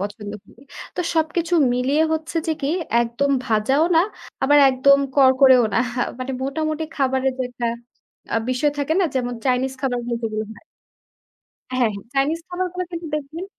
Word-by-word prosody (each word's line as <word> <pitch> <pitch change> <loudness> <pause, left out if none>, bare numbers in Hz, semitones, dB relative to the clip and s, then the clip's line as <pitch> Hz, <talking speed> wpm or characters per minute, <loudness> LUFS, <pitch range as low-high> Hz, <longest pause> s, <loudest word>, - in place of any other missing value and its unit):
পছন্দ 205 +1 -5 0.2
করি। 230 - -20 0.4
তো - - 0
সবকিছু 330 +2 0 0.2
মিলিয়ে 270 +5 +1
হচ্ছে 320 +1 -3
যে 320 - +3
কি 275 - -1 0.3
একদম 240 +4 -1
ভাজাও 230 +7 +2
না, - - +7 0.4
আবার 290 +2 +5
একদম 275 +2 +4 0.2
করকরেও 260 -2 +6
না। - - +3 0.4
মানে 255 +1 -4
মোটামুটি 310 +3 -2
খাবারের 265 -1 +1
যে - - 0
একটা 245 -1 -4 0.7
আ - - +3
বিষয় 255 +4 +1
থাকে 285 +2 0
না? - - +3
যেমন 245 -2 -1
চাইনিজ 260 0 +1
খাবারগুলো 245 -3 -2
যেগুলো 215 -1 -2
হয়। 215 - -16 1.2
হ্যাঁ, 235 -3 +3
হ্যাঁ। 200 - -9
চাইনিজ 290 +5 +1
খাবারগুলো 365 0 -3
কিন্তু 335 -1 -5
দেখবেন 305 +4 -5
270 Hz, 155 wpm, -21 LUFS, 250-310 Hz, 1.2 s, না